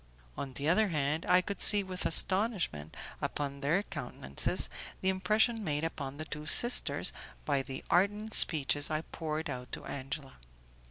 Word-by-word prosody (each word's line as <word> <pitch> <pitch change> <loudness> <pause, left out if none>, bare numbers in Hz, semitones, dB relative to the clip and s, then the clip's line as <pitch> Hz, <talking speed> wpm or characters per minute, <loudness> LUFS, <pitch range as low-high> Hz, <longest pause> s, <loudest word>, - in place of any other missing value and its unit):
On 135 -2 -7
the 140 +3 -4
other 215 +6 +2
hand, 150 -1 -2
I 180 0 +4
could 200 +1 -7
see 205 -1 +6
with 185 -1 -5
astonishment 185 - +1 0.2
upon 140 -1 -4
their 155 +8 0
countenances 70 - -3 0.3
the 190 - 0
impression 215 +5 0
made 150 -4 -3
upon 140 -4 -6
the 155 - -7
two 150 -1 -8
sisters 240 +9 +6 0.3
by 140 -2 0
the 135 0 -9
ardent 205 +5 0
speeches 145 -2 +3
I 155 0 -2
poured 160 -1 -6
out 125 -3 -8
to - - -5
Angela. 135 +1 -7
155 Hz, 155 wpm, -30 LUFS, 140-190 Hz, 0.3 s, see